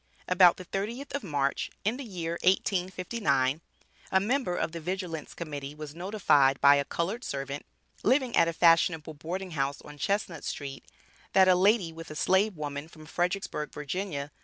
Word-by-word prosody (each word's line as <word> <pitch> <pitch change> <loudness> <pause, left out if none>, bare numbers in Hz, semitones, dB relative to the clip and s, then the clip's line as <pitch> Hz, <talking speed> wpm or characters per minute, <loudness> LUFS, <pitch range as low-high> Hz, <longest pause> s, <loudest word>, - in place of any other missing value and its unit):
About 180 -1 +6
the 185 - -9
30th 230 +10 -4
of 280 - -1
March, 140 -6 -1 0.2
in 220 +4 +1
the 280 - -6
year 175 -8 -4
1859, 180 - +1 0.5
a 190 - +5
member 225 -2 0
of - - -1
the 170 - -6
Vigilance 175 -2 -4
Committee 145 -3 -6
was 150 -1 -8
notified 165 -7 +3
by 140 0 +7
a 140 - +1
colored 190 - -3
servant, 140 +1 -5 0.3
living 255 +1 +2
at 165 - +5
a 170 - -1
fashionable 165 -2 +3
boarding 180 +5 -5
house 140 -2 -1
on 150 0 -12
Chestnut 190 -3 -1
street 135 -2 -5 0.5
that 190 -1 +6
a 185 - +7
lady 185 -2 +3
with 165 0 -9
a 155 - -7
slave 190 +4 +2
woman 145 0 -5
from 155 -1 -14
Fredericksburg, 175 -2 -2
Va. 150 -1 -4
170 Hz, 165 wpm, -29 LUFS, 150-195 Hz, 0.5 s, by